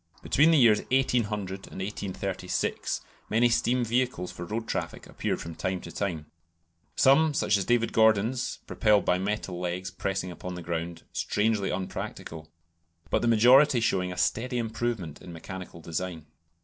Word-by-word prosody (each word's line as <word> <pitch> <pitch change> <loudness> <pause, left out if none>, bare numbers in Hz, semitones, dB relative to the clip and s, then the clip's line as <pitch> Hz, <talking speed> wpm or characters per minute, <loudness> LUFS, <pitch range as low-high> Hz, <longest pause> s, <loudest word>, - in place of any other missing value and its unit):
Between 150 +4 +4
the 165 - +5
years 115 -6 +6
1800 105 -7 0
and - - -9
1836 95 -1 -3 0.3
many 115 +3 +4
steam 120 +1 +1
vehicles 120 -6 -1
for 85 0 -7
road 110 +4 -4
traffic - - -4
appeared - - -3
from 85 - -7
time 95 +3 -2
to 85 - -9
time, 85 -4 -3 0.7
some, 145 +3 +4
such 105 - +2
as 100 -2 0
David 120 -1 +1
Gordon's 110 +3 +2
(propelled 105 -2 +2
by 90 - +2
metal 95 -2 -3
legs 90 +1 -3
pressing 95 -2 -3
upon 90 +1 -7
the 90 - -7
ground), 85 0 -4
strangely 105 -2 0
unpractical, 80 -3 -5 0.6
but - - +2
the 120 - +1
majority 125 +4 +6
showing 95 -5 0
a 90 - -7
steady 120 +7 0
improvement 115 -8 -3
in 90 - -10
mechanical 90 +1 -8
design. 85 0 -4
100 Hz, 150 wpm, -28 LUFS, 90-115 Hz, 0.7 s, years